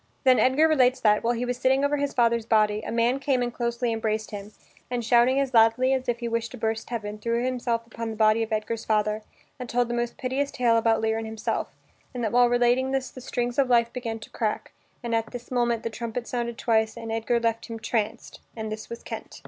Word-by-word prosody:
Then 260 -2 +5
Edgar 275 +5 +4
relates 260 -4 +3
that, 210 -1 +3
while 240 +1 +1
he 240 +2 -2
was 245 0 -2
sitting 265 +2 +3
over 290 +1 +1
his 285 0 -1
father's 235 -2 +2
body, 215 -1 +3
a - - -6
man 235 +3 +2
came 265 -2 +1
and 240 -1 -3
closely 235 0 -1
embraced 220 -1 -2
him, 205 0 -7 0.4
and, 245 -2 -2
shouting 245 +3 +4
as 270 -2 -1
loudly 230 +3 +4
as 260 -1 -1
if 240 0 -1
he 235 - -2
wished 230 0 -1
to - - -7
burst 220 0 -2
heaven, 210 -3 -4
threw 235 +2 -1
himself 240 -2 -1 0.2
on 230 -1 -2
the 220 - -5
body 215 +1 +3
of 225 0 -3
Edgar's 220 +1 -2
father, 215 0 0 0.4
and 250 -1 -6
told 245 0 +1
the - - -2
most 240 0 -2
piteous 270 +2 -1
tale 240 -4 +2
about 225 -1 +2
Lear 220 0 0
and 225 - -5
himself, 220 0 -3 0.4
and 245 - -3
that 220 - 0
while 245 0 +5
relating 245 +2 +2
this 265 -1 -2
the 255 - -10
strings 245 0 -2
of 265 -2 +3
life 235 -1 +3
began 230 -3 -4
to - - -11
crack, 215 -2 -2 0.3
but 235 -1 -3
at 225 0 0
this 245 0 -9
moment 240 -2 +1
the - - -2
trumpet 235 +2 -5
sounded 235 -1 -3
twice 220 -1 +1
and 225 -1 -6
Edgar 225 +1 0
left 230 -1 -1
him 230 -1 -6
"tranced" 225 0 -3 0.2
and 220 -1 -5
this 215 0 -6
was 235 - -8
Kent. - - -8
235 Hz, 235 wpm, -26 LUFS, 225-245 Hz, 0.4 s, Then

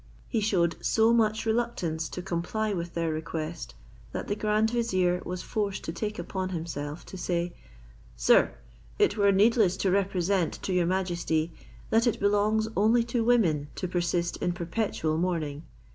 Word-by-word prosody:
He 225 - 0
shewed 175 -6 +1
so 225 +1 +4
much 220 -1 +2
reluctance 220 -9 -1
to 180 - -6
comply 195 +5 -2
with 170 -2 -4
their 165 -1 0
request, 155 +1 -5 0.4
that - - -4
the 205 - -1
grand 215 +1 +1
vizier 185 -7 +1
was 180 0 -5
forced 205 -3 -2
to 165 - -4
take 210 +4 -3
upon 185 +2 -3
himself 160 -3 -5
to 190 - -9
say; 175 -1 -1 0.6
"Sir, - - +4 0.4
it 205 - +3
were 200 -2 +4
needless 200 -1 +4
to 190 -1 +1
represent 190 -2 +1
to 190 - -1
your 180 -2 +2
majesty, 170 -3 0 0.4
that 225 +2 +4
it 235 - +1
belongs 205 +2 +2
only 225 +4 +4
to 235 0 -1
women 180 -12 +3
to 185 - -3
persist 175 -1 -1
in 175 - -1
perpetual 170 -3 -1
mourning. 160 -4 -2
185 Hz, 160 wpm, -28 LUFS, 170-215 Hz, 0.6 s, so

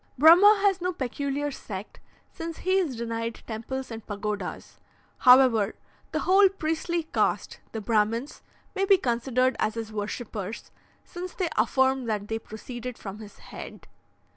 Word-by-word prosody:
Brahma 365 +8 +8
has 390 -2 +3
no 365 +1 0
peculiar 280 +1 -2
sect, 205 -6 -8 0.3
since 330 0 -6
he 375 +1 +2
is 315 -9 -1
denied 230 0 -4
temples 245 +4 -5
and 225 -1 -7
pagodas; 205 -2 -5 0.4
however, 250 -5 +6 0.4
the - - -1
whole 385 +1 +6
priestly 335 -1 -2
caste - - 0
the 220 - -4
Brahmins 225 +5 0 0.3
may 390 -1 -1
be 390 -1 +6
considered 255 -2 +1
as 215 - 0
his 225 -1 -5
worshippers, 210 0 -5 0.3
since 360 +1 -7
they 365 -3 -1
affirm 265 +3 +2
that 210 -2 -2
they 225 0 -1
proceeded 240 +3 -8
from 200 +1 -8
his 210 -2 -11 0.2
head. - - -9
250 Hz, 140 wpm, -27 LUFS, 220-325 Hz, 0.4 s, Brahma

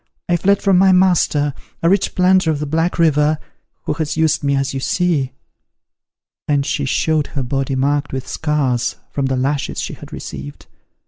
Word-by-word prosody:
I 175 - +2
fled 200 +3 +2
from 195 -3 +4
my 190 0 +5
master, 175 -6 +3 0.3
a - - +4
rich 195 +2 +2
planter 185 -1 +4
of 155 - +1
the 150 - -3
Black 165 +4 0
River, 155 -2 +3 0.5
who - - -1
has 155 0 -3
used 155 -2 +2
me 140 0 +1
as 135 0 -1
you 135 - -2
see;" 150 -3 0 1.2
and 145 -2 +1
she 145 -1 -1
showed 155 +3 +1
her 140 -4 -4
body 135 +1 -2
marked 145 +2 0
with 130 -1 -4
scars 140 -6 -1 0.2
from 140 -2 -1
the 130 -1 -1
lashes 140 +2 -1
she - - -4
had - - -12
received. 70 +1 -8
150 Hz, 180 wpm, -18 LUFS, 135-170 Hz, 1.2 s, my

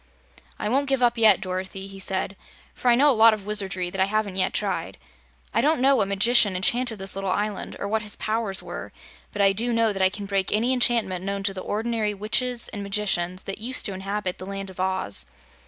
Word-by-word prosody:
"I - - -3
won't 275 +5 +1
give 270 -2 +1
up 240 0 +3
yet, 220 -2 +5
Dorothy," 190 +1 -5
he 195 0 -11
said, 190 0 -2 0.4
"for - - -5
I 240 - +6
know 285 +4 +5
a - - +3
lot 225 -1 +6
of 205 -2 -12
wizardry 195 -4 0
that 190 0 -2
I - - +5
haven't 205 -1 -1
yet 185 - 0
tried. - - -3 0.6
I - - +2
don't 310 -1 +2
know 270 +2 +4
what 195 - +1
magician 205 0 +4
enchanted 235 +5 +2
this 195 0 -3
little 195 0 -3
island, 205 +2 -2
or 200 - -4
what 220 +2 0
his 210 -1 -1
powers 215 -3 -1
were, - - -7 0.4
but 205 - 0
I 195 0 +4
DO 235 +5 +1
know 230 -2 +2
that 195 - -4
I 190 - +5
can 205 +1 -7
break 195 -1 -1
any 235 +5 +2
enchantment 230 -7 +1
known 200 0 -3
to 195 0 0
the 190 - -6
ordinary 215 0 -2
witches 235 +4 0
and 205 - -7
magicians 195 -3 -1
that 195 - -6
used 250 +4 0
to 200 - 0
inhabit 190 0 -4
the 185 - -8
Land 195 -1 -6
of 185 - -15
Oz. 185 - -2
205 Hz, 225 wpm, -24 LUFS, 190-230 Hz, 0.6 s, I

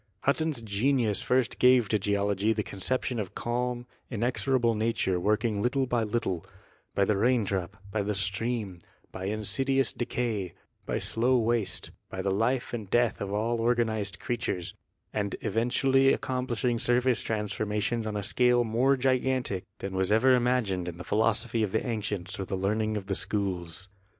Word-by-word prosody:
Hutton's 150 -2 0
genius 110 +1 +1
first 125 -3 +1
gave 125 -3 +5
to 105 - +2
geology 100 +1 +1
the 105 -1 -1
conception 125 +5 -2
of 100 -4 -5
calm, 120 0 -2 0.2
inexorable 120 +1 +1
nature 110 -4 0
working 105 +2 +1
little 130 +3 +1
by 120 -2 0
little 105 -6 -1 0.3
— - - -35
by 100 - +3
the 105 - +2
rain 120 +3 +3
drop, 95 0 -3
by 110 - 0
the 105 +1 -1
stream, 100 0 -2 0.3
by 95 - -6
insidious 110 +6 +1
decay, 115 -7 -2 0.3
by - - 0
slow 125 +3 +2
waste, 115 -2 0 0.2
by 95 - -4
the 95 - +1
life 120 +7 0
and 110 -5 -4
death 120 -2 +2
of 100 -1 -3
all 115 +3 0
organized 115 -4 0
creatures 115 -7 -3 0.2
— - - -47
and 105 -2 -1
even 115 +2 0
tually 135 +1 +4
accomplishing 125 -2 -1
surface 125 0 +2
transformations 105 +1 -1
on 105 -1 -2
a 100 - -3
scale 125 +3 +3
more 125 +5 +2
gigantic 130 -6 0
than 95 0 -5
was 95 +1 +1
ever 125 +5 +5
imagined 120 -8 +1
in 85 - -8
the 90 - -7
philosophy 110 +2 +1
of 105 -3 0
the 110 - 0
ancients 105 -6 -3
or 95 - -2
the 95 - -3
learning 110 +3 0
of 100 - -5
the 100 - -2
schools. 95 -4 -2
110 Hz, 165 wpm, -28 LUFS, 100-125 Hz, 0.3 s, gave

